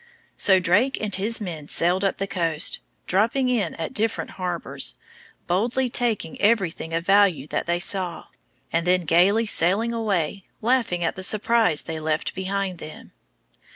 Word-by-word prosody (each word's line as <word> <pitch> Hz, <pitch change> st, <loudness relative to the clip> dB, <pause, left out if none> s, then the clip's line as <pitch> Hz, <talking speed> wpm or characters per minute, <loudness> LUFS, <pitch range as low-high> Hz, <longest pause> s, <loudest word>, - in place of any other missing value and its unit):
So 190 Hz, -1 st, +4 dB
Drake 200 Hz, +10 st, +2 dB
and 210 Hz, -2 st, -3 dB
his 210 Hz, +5 st, +1 dB
men 165 Hz, -8 st, -6 dB
sailed 180 Hz, +5 st, +2 dB
up 195 Hz, -, 0 dB
the 195 Hz, -, -2 dB
coast, 165 Hz, -5 st, 0 dB, 0.3 s
dropping 230 Hz, +7 st, +1 dB
in 240 Hz, -5 st, 0 dB
at 160 Hz, -, -5 dB
different 220 Hz, +1 st, -1 dB
harbors, 180 Hz, -2 st, -3 dB, 0.5 s
boldly 240 Hz, +8 st, 0 dB
taking 230 Hz, -9 st, -1 dB
everything 195 Hz, -7 st, +1 dB
of 165 Hz, +1 st, -2 dB
value 195 Hz, -8 st, +3 dB
that -, -, -2 dB
they 170 Hz, 0 st, +1 dB
saw, 180 Hz, -1 st, -2 dB, 0.5 s
and 165 Hz, +1 st, 0 dB
then 180 Hz, 0 st, +3 dB
gayly 185 Hz, +7 st, +3 dB
sailing 205 Hz, +4 st, +1 dB
away, 200 Hz, -5 st, -1 dB, 0.2 s
laughing 230 Hz, -7 st, 0 dB
at 165 Hz, -, -1 dB
the 190 Hz, -, -7 dB
surprise 215 Hz, -3 st, +2 dB
they 160 Hz, -1 st, -5 dB
left 155 Hz, 0 st, -2 dB
behind 190 Hz, -1 st, -3 dB
them. 155 Hz, -, -10 dB
190 Hz, 155 wpm, -23 LUFS, 170-220 Hz, 0.5 s, So